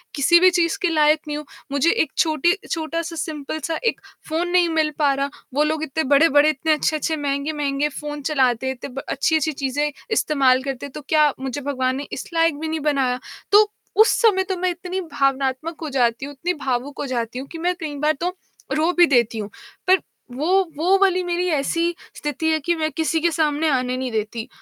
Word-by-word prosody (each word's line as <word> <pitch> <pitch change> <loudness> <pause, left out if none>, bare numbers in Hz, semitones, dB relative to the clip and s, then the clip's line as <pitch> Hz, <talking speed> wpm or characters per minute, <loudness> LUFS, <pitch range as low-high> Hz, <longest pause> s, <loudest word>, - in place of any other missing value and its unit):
किसी 340 +5 +5
भी 370 - +7
चीज़ 340 -2 +1
के 355 - +2
लायक 305 -1 +3
नहीं 295 0 -3
हूँ? 300 - -7 0.3
मुझे 285 +4 +3
एक 320 -10 0
छोटी 320 +2 +3 0.2
छोटा-सा 330 +1 -3
सिंपल 310 -1 -4
सा 330 - -1
एक 455 - 0 0.3
फ़ोन 330 +3 0
नहीं 355 -1 +4
मिल 315 -2 +1
पा 285 -2 +3
रहा, 275 +1 -1 0.2
वो 295 - +3
लोग 310 0 -1
इतने 315 +1 -2
बड़े-बड़े, 290 +2 +5
इतने 310 +1 +1
अच्छे-अच्छे 310 +1 0
महँगे-महँगे 285 0 -1
फ़ोन 295 +1 -6
चलाते 260 -4 +1
थे, - - +1
इतने 255 0 -8
ब 275 - -4
अच्छी-अच्छी 315 +2 +1
चीज़ें 285 +2 -1 0.2
इस्तेमाल 270 -10 +3
करते 270 -1 -4
थे, - - -7
तो 300 - -8
क्या 300 -2 +4
मुझे 265 +1 -4
भगवान 260 -2 -1
ने 280 +1 -5
इस - - -6
लायक 330 -3 +2
भी 320 - -3
नहीं 315 0 -2
बनाया? 255 -3 0 0.3
तो 415 +1 +6 0.3
उस 445 - +6
समय 405 -5 +4
तो 380 - 0
मैं 365 +1 0
इतनी 360 +2 -5
भावनात्मक 275 +1 -1
हो 315 - -4
जाती 245 -2 +1
हूँ, 285 - -8
इतनी 345 +6 -2
भावुक 260 +2 -2
हो - - -2
जाती 240 -1 -3
हूँ 270 - -7
कि 330 - -7
मैं 360 +2 0
कई 295 -2 -4
बार 300 +2 +2
तो 360 +2 -1 0.4
रो 315 +3 +2
भी 350 - +8
देती 235 -6 +2
हूँ। 205 -1 -5 0.4
पर 375 0 +6 0.4
वो 300 - -1 0.3
वो 360 +5 +3
वाली 370 -2 +3
मेरी 355 +1 -1
ऐसी 335 +4 0 0.2
स्थिति 295 +2 -3
है 315 - +2
कि 345 - +2
मैं 310 -1 -1
किसी 320 0 0
के 340 +1 +2
सामने 310 0 +1
आने 255 -2 0
नहीं 255 -1 -3
देती, 220 +1 -3
300 Hz, 210 wpm, -22 LUFS, 275-330 Hz, 0.4 s, भी